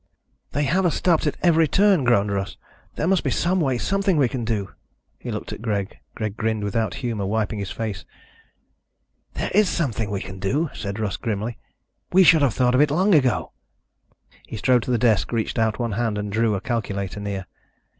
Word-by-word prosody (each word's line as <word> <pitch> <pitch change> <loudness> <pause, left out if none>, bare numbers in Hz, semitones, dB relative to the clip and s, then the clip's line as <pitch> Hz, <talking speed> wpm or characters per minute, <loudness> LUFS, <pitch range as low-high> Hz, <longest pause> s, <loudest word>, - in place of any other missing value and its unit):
"They 145 - +1
have 175 +8 +1
us 165 - -1
stopped 165 -4 +2
at 150 - -1
every 165 -2 +4
turn," 195 -3 +3
groaned 105 -4 +3
Russ. 100 0 -3 0.4
"There - - -1
must 185 0 +2
be - - 0
some 185 +2 +1
way, 135 -5 +1
something 195 - +1
we 140 -3 +4
can 120 0 -4
do." 110 -4 -2 0.5
He - - -7
looked - - -4
at - - -9
Greg. 105 -3 -3 0.2
Greg 110 -2 -3
grinned 110 -2 -1
without 105 -1 -1
humor, 110 -5 -2
wiping 110 0 -1
his 100 -2 -4
face. 105 -4 -4 1.3
"There - - -3
is 205 -1 +4
something 115 - -1
we 100 -1 -2
can 95 0 -8
do," 140 - 0
said 100 +1 -5
Russ 105 -4 -2
grimly. 110 +1 -3 0.5
"We 190 +1 +6
should 160 -3 +6
have 135 -7 +2
thought 125 -1 +2
of 130 - +4
it 150 - +4
long 185 +7 +2
ago." 130 -6 +2 1.0
He - - -6
strode 125 +2 +3
to - - -6
the 120 - +3
desk, 115 -3 +2
reached 115 0 -1
out 110 -2 +1
one 120 -2 -2
hand 110 0 -1
and 105 0 -3
drew 110 0 +1
a 95 - -3
calculator 100 -5 -3
near. 100 -2 -4
115 Hz, 200 wpm, -23 LUFS, 105-150 Hz, 1.3 s, We